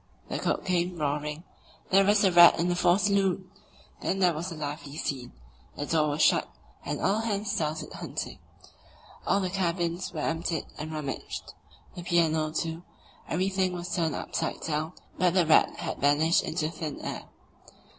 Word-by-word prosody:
The - - -2
cook - - -1
came 180 -1 0
roaring: 150 +1 -2 0.5
"There's 195 +2 +5
a 190 - +5
rat 175 0 +8
in 170 +1 +1
the 175 - +1
fore 175 +1 +4
saloon!" 195 -2 +1 0.5
Then 195 - 0
there 180 -3 +4
was 170 +4 -4
a - - -5
lively 145 -1 -6
scene; 130 -6 -3 0.4
the 145 - -3
door 155 -1 +2
was 145 +2 +1
shut, - - +3 0.3
and - - -3
all 200 +3 +2
hands 210 -2 -1
started 155 0 -2
hunting. - - -5 0.9
All 200 - +3
the 185 -2 -2
cabins 175 -1 -1
were 160 -3 -4
emptied 165 0 -1
and 155 +1 -5
rummaged, 150 -4 -5 0.4
the 175 - -7
piano, 165 -3 +2
too; 165 +1 -3 0.5
everything 185 +1 0
was 175 0 -4
turned 165 -4 0
upside - - -3
down, 155 +2 -2 0.3
but 180 -1 +3
the 180 -3 +4
rat 155 - +4
had - - -5
vanished 150 +4 +4
into 160 -1 -2
thin 155 -3 -5
air. - - -5
170 Hz, 165 wpm, -28 LUFS, 155-185 Hz, 0.9 s, rat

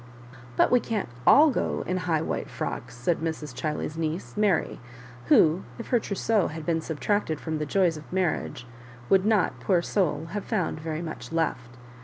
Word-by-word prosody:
"But - - +4
we 250 - +6
can't 220 - -3 0.2
all 300 +1 +8
go - - -1
in 185 - -1
high 170 -4 0
white - - -3
frocks," - - -5
said 160 +8 0
Mrs. 160 -3 -4
Chiley's 150 +4 -3
niece, 160 +3 -3
Mary, 205 -5 +1 0.5
who, 160 +3 +5 0.2
if 230 - -8
her 245 - +4
trousseau 210 -1 0
had 155 0 -7
been 165 -1 +1
subtracted 160 +1 -1
from 160 -1 -3
the 150 - -2
joys 175 -2 +2
of 155 - -12
marriage, 180 -8 -1 0.4
would 195 +1 +4
not, 215 -4 +2
poor 180 -3 +2
soul! 170 -5 0
have 205 +1 -3
found 185 -9 -1
very 160 +1 -4
much 160 -1 -7
left. 125 -7 -2
165 Hz, 175 wpm, -26 LUFS, 155-195 Hz, 0.5 s, all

